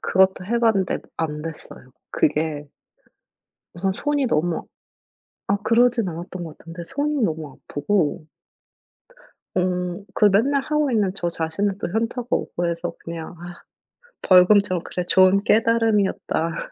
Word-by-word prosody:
그것도 190 -1 +2
해봤는데 225 -4 +1 0.2
안 150 -2 -2
됐어요. 150 -5 -9 0.2
그게 150 -1 0 1.1
우선 190 +3 -1
손이 290 +5 0
너무 165 -2 0 0.8
아 200 - +3
그러진 230 0 +2
않았던 175 +1 -6
것 160 -2 -9
같은데 165 +1 -9
손이 285 - -1
너무 155 -7 -3
아프고 155 0 0 1.3
음. 180 +1 -1
그 - - +3
맨날 235 +8 +3
하고 300 -1 0
있는 210 -5 +2
저 175 -3 -2
자신은 170 +5 -2
또 - - -2
현타가 230 +3 -2
오고 175 0 -1
해서 170 0 -4
그냥 165 0 -7
아 175 0 -10 0.6
"벌금처럼 185 0 +5
그래, 180 - -4
좋은 190 +2 +5
깨달음이었다." 215 -7 +1
185 Hz, 265 characters per minute, -22 LUFS, 165-220 Hz, 1.3 s, 벌금처럼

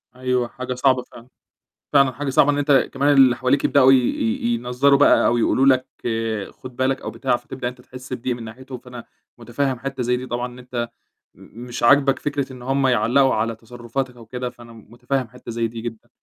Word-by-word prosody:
أيوه، 125 -1 -1
حاجة 130 +1 -6
صعبة 130 0 +2
فعلًا، 120 -1 -15 0.7
فعلًا 140 -2 +4
حاجة 140 +3 -4
صعبة 135 +2 +4
إن 145 - -1
أنت 140 -2 +3
كمان 145 +2 +2
اللي 130 -3 +6
حواليك 130 +3 +1
يبدؤوا 135 -2 +5
ي - - +7
ي 120 -1 0
ينظَّروا 125 +4 +2
بقى، 145 - +5
أو 120 - +2
يقولوا 130 +3 +2
لك 130 -1 +4 0.6
خُد 130 -1 -12
بالك 130 +1 0
أو - - -4
بتاع، 125 +1 0
فتبدأ 125 0 -6
أنت 125 0 -10
تحِسّ 130 +1 -12
بضيق 125 0 -2
من 120 - -9
ناحيتُهم، 125 +3 -9
فأنا 125 -1 -11 0.3
مُتفهم 125 +2 -2
حِتّة 135 0 -4
زي 125 +1 +1
دي 130 +1 -6
طبعًا 120 0 -3
إن 125 0 -11
أنت 125 -2 -4 0.5
م 120 - -13
مش 120 - -6
عاجبك 135 +2 +4
فكرة 140 -2 -3
إن 125 - -11
هُم 135 +2 +1
يعلقوا 130 +3 +3
على 115 +1 -1
تصرفاتك 120 +3 -5
أو 115 - -13
كده، 125 +2 -5
فأنا 120 -1 -15
مُتفهم 120 +4 -4
حِتّة 125 0 -10
زي 115 0 -1
دي 115 0 -8
جدًا، 120 0 -8
125 Hz, 205 wpm, -21 LUFS, 120-135 Hz, 0.7 s, ي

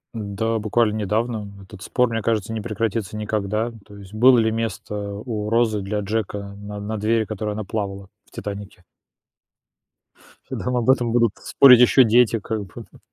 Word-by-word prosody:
Да, 110 +1 -2
буквально 110 +1 +1
недавно 110 +1 -2 0.2
этот 95 0 -13
спор, 125 +5 +1
мне 115 -1 -2
кажется, 110 0 -1
не 110 - -3
прекратится 110 -2 -3
никогда. 105 +2 -2
То 100 0 -14
есть 100 0 -13
было 125 +3 +6
ли 110 -1 +2
место 110 -2 -4 0.3
у 105 -4 -3
Розы 115 -2 +2
для 105 +2 -3
Джека 100 -1 -4
на 105 0 -7
на 105 +2 -4
двери, 110 +2 +1
на - - -2
которой 105 0 -4
она 110 +1 -4
плавала 100 -1 -5 0.2
в - - -29
"Титанике"? 100 -2 -8 1.7
Нам 125 0 -2
об 120 0 0
этом 120 -3 +3
будут 115 -3 +3
спорить 125 -3 +6
еще 125 +2 +6
дети, 115 0 +3
как 110 0 -4
бы, 95 - -19
д - - -21
110 Hz, 175 wpm, -22 LUFS, 105-115 Hz, 1.7 s, было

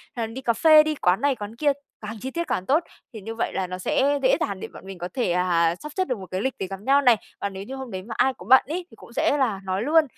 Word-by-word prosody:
hay 230 -2 -2
là 225 - -10
đi 260 - -6
cà 235 -3 +1
phê, 310 +6 +7
đi 310 0 -1
quán 185 -5 +2
này 285 -1 +2
quán 210 -1 -7
kia, 290 +3 +2 0.3
càng 215 +1 -6
chi 265 - -4
tiết 340 +1 -3
càng 185 - -2
tốt, 300 - +3 0.3
thì 220 - -8
như 225 +3 -6
vậy 225 - -2
là 190 -1 -1
nó 185 0 -5
sẽ 280 +9 +1
dễ 260 - +5
dàng 200 -2 -2
để - - -6
bọn - - -12
mình 195 -1 -8
có 175 0 -4
thể, 245 -9 0
à, 170 -2 +2
sắp 300 +11 -9
xếp 375 - +2
được 250 - -1
một 190 - -8
cái 185 +1 -2
lịch 265 +3 -1
để 190 - -2
gặp 195 +1 -7
nhau 275 +5 +4
này. 245 -4 +6 0.2
Còn 200 -1 -3
nếu 190 0 -6
như 260 +6 -7
hôm 265 -3 -7
đấy 185 -1 -5
mà 225 +3 -7
ai 265 - +3
có - - -12
bận 260 - +8
ấy, 345 +4 -3
thì - - -14
cũng - - -15
sẽ 290 - +2
là 235 -8 +1
nói 190 +1 -2
luôn, 315 +4 +5
230 Hz, 325 wpm, -24 LUFS, 190-275 Hz, 0.3 s, bận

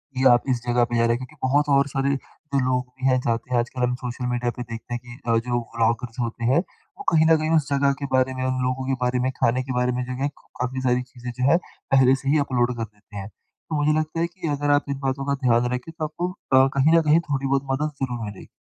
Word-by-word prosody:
कि 130 - 0
आप 120 - +4
इस 125 -2 +1
जगह 120 0 +3
पे - - 0
जा 115 - +3
रहे 115 0 +3
हैं। - - -2
क्योंकि 130 +5 -10
बहुत 145 +3 +2
और 140 0 +3
सारे 140 0 0
जो 140 0 -5
लोग 125 0 +1
भी 130 0 -1
हैं 130 -1 +4
जाते 115 +1 -2
हैं 120 - +4
आजकल 125 +2 -3
हम 125 0 +1
सोशल 125 0 -4
मीडिया 120 0 0
पे 125 - -3
देखते 115 0 -7
हैं 120 - -2
कि 120 0 -10
अ, 115 - +4
जो 120 +1 0 0.2
ब्लॉगर्स 115 +1 0
होते 120 0 -3
हैं 135 - +4
वो 200 - -10
कहीं 160 -1 +5
न 160 - +7
कहीं 155 0 -1
उस 150 -4 +2
जगह 140 0 +3
के - - -1
बारे 130 0 +3
में, 130 0 -4
उन 130 0 0
लोगों 130 +1 -1
के 135 - +1
बारे 125 0 +1
में, 130 +1 0
खाने 130 -1 +1
के 130 0 -4
बारे 125 0 +1
में 125 0 -2
जो 125 +1 -4
एक 145 - -1 0.3
काफ़ी 130 +1 -2
सारी 125 -1 +2
चीज़ें 125 -1 -8
जो 125 +2 +1
हैं 170 - +6 0.3
पहले 130 -1 +6
से 135 - -2
ही 150 - +4
अपलोड 125 -1 +1
कर 115 - -2
देते 105 -1 -12
हैं। 100 -1 -5
तो 155 - -10
मुझे 150 +1 +2
लगता 155 +1 -3
है 170 - +1
कि 175 0 -7
अगर 145 0 +1
आप 145 0 +3
इन 140 -1 -2
बातों 135 0 -2
का 140 - +1
ध्यान 120 0 +4
रखें 125 +6 -4
तो 155 - -1
आपको 175 +4 -3
अ, 135 -7 +3
कहीं 155 +5 +5
न - - +5
कहीं 155 +1 +4
थोड़ी 135 -1 0
बहुत 135 0 +1
मदद 150 +3 0
ज़रूर 120 -3 -3
मिलेगी। 105 -2 -9
130 Hz, 275 wpm, -24 LUFS, 120-140 Hz, 0.3 s, न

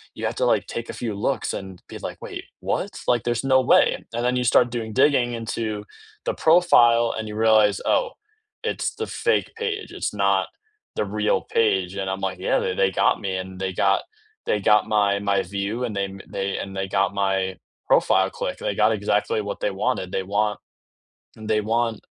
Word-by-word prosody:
You - - -4
have - - -2
to, - - 0
like, - - +2
take 115 - -5
a - - -4
few 115 -3 -4
looks 100 - -1
and 95 -2 -7
be - - -8
like, - - -6
"Wait, - - -7 0.2
what? - - -1 0.2
Like, 120 -3 +2
there's 120 0 -1
no 130 -1 +4
way," 125 - +4 0.2
and 120 +1 -1
then 125 +1 +1
you 125 - 0
start 120 0 +4
doing 115 -2 -4
digging 130 -2 +3
into 110 -2 -3 0.4
the - - 0
profile 120 -9 +5
and 110 0 -4
you 105 - -6
realize, 110 -2 +4
"Oh, - - +2 0.5
it's 460 - -2
the 445 - -4
fake - - 0
page, 450 -2 -3
it's - - -3
not - - +1 0.5
the - - 0
real 105 -1 0
page," 95 -4 0
and 95 -1 -3
I'm 95 0 -3
like, 95 -1 -3
yeah, 95 - +1
th 90 - -2
they 95 -1 +3
got - - +2
me 95 -1 -2
and 95 0 -7
they 95 0 -1
got 95 +2 +2 0.4
they 105 - +1
got 105 +1 +4
my 100 -2 +2
my 100 -1 +1
view 100 +5 -3
and 115 -4 -3
they 100 0 0
m 95 0 -9
they 100 0 -3
and 95 0 -6
they 95 0 -2
got 100 +1 +1
my 95 -1 0 0.3
profile 95 0 +3
click. - - -4
They 100 - -2
got 110 +2 +4
exactly 105 +1 0
what 100 -1 -5
they 105 - 0
wanted. 95 -1 -2
They 95 - -1
want 105 +2 0 0.8
they 110 0 -1
want 115 +1 -1
105 Hz, 205 wpm, -23 LUFS, 95-115 Hz, 0.8 s, profile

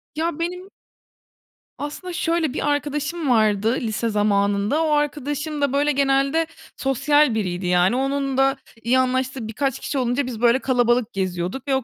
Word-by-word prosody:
Ya, 330 +2 0
benim 360 +3 -4 1.1
Aslında 300 +5 -6
şöyle 330 -4 0
bir 295 - -1
arkadaşım 295 +2 -2
vardı, 220 -1 +3
lise 230 0 -1
zamanında, 205 +5 +1
o 315 - 0
arkadaşım 295 0 -1
da, 280 -2 +1
böyle, 290 +1 +2
genelde 275 +3 +2 0.3
sosyal 275 0 +2
biriydi. 180 -4 -2
Yani 180 +4 +3
onun 275 0 -1
da 270 +1 +3 0.3
iyi 250 +3 +3
anlaştığı 260 -2 -1
birkaç 270 +4 -2
kişi 285 - -4
olunca 250 +1 0
biz, 240 -3 -6
böyle, 240 +1 +4
kalabalık 245 -3 +1
geziyorduk 185 +6 -3
ve 270 - +2
o 265 - -1
270 Hz, 150 wpm, -22 LUFS, 230-290 Hz, 1.1 s, böyle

